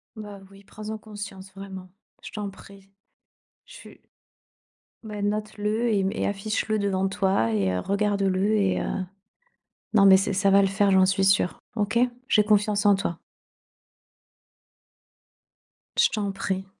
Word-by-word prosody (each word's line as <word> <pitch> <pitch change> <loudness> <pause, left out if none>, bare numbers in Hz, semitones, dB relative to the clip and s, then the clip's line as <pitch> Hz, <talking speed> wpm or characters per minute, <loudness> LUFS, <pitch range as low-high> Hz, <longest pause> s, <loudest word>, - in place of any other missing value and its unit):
Bah, 205 -2 -9
oui, 195 0 -17
prends 215 +2 -10
en 220 - -4
conscience 205 -3 -9
vraiment, 190 -1 -9 0.3
je - - -8
t'en 210 -2 -4
prie. 195 0 -15 0.8
Je - - -16
suis, - - -14 1.0
bah, 210 -2 -6
note-le 210 +2 -1
et 210 -3 +2
hem 195 +1 0
et - - -2
affiche-le 215 +2 -2
devant 195 -1 0
toi 190 - +1
et 95 -3 +1
heu, 90 - -1
regarde 200 - 0
le 195 +2 +1
et 195 -3 +1
heu, - - -3 1.1
non 200 -2 +5
mais 190 - +9
c'est 195 +1 0
ça 195 +1 +1
va 200 +1 +6
le 195 - +2
faire, 200 0 +2
j'en 190 0 +5
suis 190 0 +2
sûre, 195 -2 +2 0.2
OK? 215 +2 0 0.3
J'ai 210 - +4
confiance 210 0 +2
en 205 - +6
toi! 180 -4 -3 2.8
Je - - +5
t'en 205 -2 -2
prie. 190 0 -3
200 Hz, 155 wpm, -25 LUFS, 195-210 Hz, 2.8 s, mais